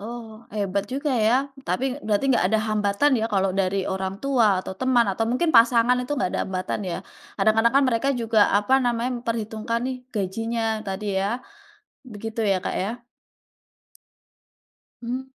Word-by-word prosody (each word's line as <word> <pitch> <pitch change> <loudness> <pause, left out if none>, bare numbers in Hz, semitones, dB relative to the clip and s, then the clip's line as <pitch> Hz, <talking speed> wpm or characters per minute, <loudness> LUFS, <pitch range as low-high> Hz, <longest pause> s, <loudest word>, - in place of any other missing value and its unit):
Oh, 225 0 -9
hebat 200 -1 -1
juga 280 +2 -1 0.2
ya. 225 - +4 0.3
Tapi 185 +9 -1 0.2
berarti 210 +5 +1
enggak - - +3
ada 220 - +2
hambatan 210 +7 +2
ya 220 - 0
kalau 195 -1 +2
dari 190 +1 0
orang 190 0 -3
tua 260 -5 +3 0.2
atau - - -5
teman, 255 -2 +3
atau 225 +4 -1
mungkin 320 +7 +1
pasangan 235 +1 +5
itu 250 +3 -4
enggak 185 - 0
ada - - -1
hambatan 185 +2 -3
ya. - - -2 0.4
Kadang-kadang 225 +2 +3
kan 275 - +5
mereka 240 +2 0
juga 225 -1 +1 0.2
apa 210 +6 +2
namanya, 240 +1 0
memperhitungkan 230 0 -2
nih 260 -1 -3 0.2
gajinya 225 +4 -2 0.2
tadi 195 +2 -4
ya. 195 - 0 0.9
Begitu 225 +2 -5
ya 195 - +3
Kak - - -2
ya? 235 +5 -5 2.0
Mmm. 250 +3 -3
225 Hz, 155 wpm, -24 LUFS, 205-240 Hz, 2.0 s, pasangan